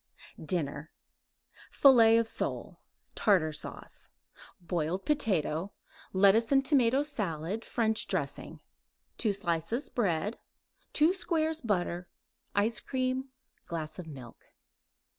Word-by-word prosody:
DINNER 155 -3 -2 0.8
Fillet 230 -5 +6
of 230 -1 +2
sole, - - -4 0.3
Tartar 175 -7 +2
sauce; 150 - -7 0.5
boiled 175 +1 -2
potato; 195 - 0 0.4
lettuce 200 +5 +4
and 270 0 +4
tomato 265 -1 +3
salad, 205 - -3
French 220 -1 0
dressing; - - -4 0.6
2 220 - +2
slices 190 - -2
bread; 205 -1 -1 0.5
2 310 +4 +5
squares 320 -4 -1
butter; 180 -5 -2 0.5
ice 215 +3 +2
cream; 260 0 -2 0.4
glass 160 0 -5
of 175 - -7
milk. 130 -6 -11
205 Hz, 100 wpm, -30 LUFS, 170-255 Hz, 0.8 s, Fillet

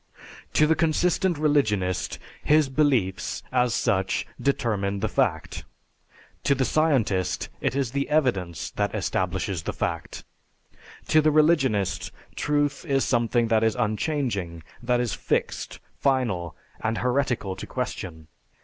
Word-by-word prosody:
To 150 - +5
the 160 - +4
consistent 170 +2 +1
religionist, 110 - +1 0.3
his 150 -2 +4
belief, 130 -10 +1
as 125 -2 +2
such, 95 -5 0 0.2
determine 100 -7 0
the 110 - 0
fact; 105 - -1 0.8
to 140 - +3
the 130 -1 +1
scientist 125 - +1
it - - -1
is 135 -4 0
the 140 +1 -2
evidence 110 - 0
that - - -1
establishes 95 -5 -1
the - - -4
fact. - - -4 0.9
To 155 - +5
the 155 - +4
religionist 135 - +2 0.2
truth 145 -1 0
is 135 -4 +1
something 120 -1 +2
that 110 -1 +3
is 110 -1 +2
unchanging, 110 - -1 0.2
that 125 0 +1
is 120 -3 -1
fixed, - - -2 0.2
final, 115 - 0 0.2
and 110 0 -1
heretical 125 -6 0
to - - -8
question. 90 -11 -5
125 Hz, 125 wpm, -25 LUFS, 100-145 Hz, 0.9 s, To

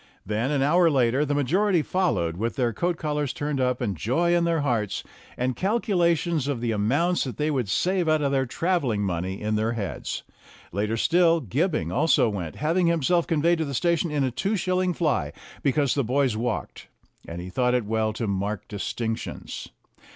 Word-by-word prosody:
Then, 110 +5 -1
an 140 -2 +1
hour 170 +4 +4
later, 130 0 +2
the 145 0 -1
majority 175 +5 +2
followed 160 - 0
with 115 +6 -2
their 120 -4 0
coat 175 +4 -1
collars 150 -3 -1
turned 145 -2 -2
up 125 0 0
and 105 -6 -1
joy 165 - +1
in 170 -1 +2
their 165 -2 +1
hearts, 115 -8 -1 0.3
and 125 0 -1
calculations 175 - +1
of 140 -4 -1
the 115 -1 -1
amounts 140 +13 +1
that 130 - -5
they 150 +1 0
would 125 -8 -1
save 180 - +1
out 155 -1 +2
of 140 - +1
their 135 -1 +1
travelling 130 - 0
money 95 +1 -2
in 110 0 -1
their 110 +2 0
heads. 100 - -4 0.5
Later 105 +4 -1
still, 170 +5 +4
Gibbing 155 - -1
also 140 -7 +3
went, 90 -7 -5
having 170 +4 +1
himself 170 +1 +2
conveyed 165 +2 +2
to 160 - 0
the 140 -2 -4
station 170 +2 +1
in 150 -2 0
a 130 - 0
two 195 - -1
shilling 185 -1 0
fly, 130 - 0 0.3
because 140 -1 +2
the 140 - +1
boys 130 0 +1
walked, 115 0 -3 0.4
and 85 +1 -6
he 90 +1 -7
thought 125 +5 +1
it 125 -4 0
well 110 0 0
to 115 +1 -3
mark 100 +1 -2
distinctions. 110 +2 -4
140 Hz, 190 wpm, -25 LUFS, 110-170 Hz, 0.5 s, hour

